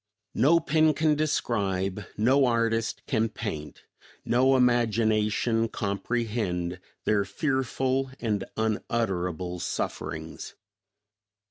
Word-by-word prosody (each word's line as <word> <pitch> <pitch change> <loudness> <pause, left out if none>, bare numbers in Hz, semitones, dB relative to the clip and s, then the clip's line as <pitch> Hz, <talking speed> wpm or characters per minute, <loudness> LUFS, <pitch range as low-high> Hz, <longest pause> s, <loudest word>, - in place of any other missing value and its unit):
No 150 +9 +4
pen 155 -1 +3
can 155 0 +3
describe, 100 -10 -1
no 130 +6 +4
artist 115 -1 0
can 115 -3 +1
paint, 75 -11 -6 0.4
no 130 +3 +4
imagination 115 -2 +2
comprehend 100 -4 -2 0.3
their 105 -2 +3
fearful 130 +3 -1
and 105 -4 -1
unutterable 90 -5 -1
sufferings. 80 -1 -4
115 Hz, 85 wpm, -27 LUFS, 100-130 Hz, 0.4 s, No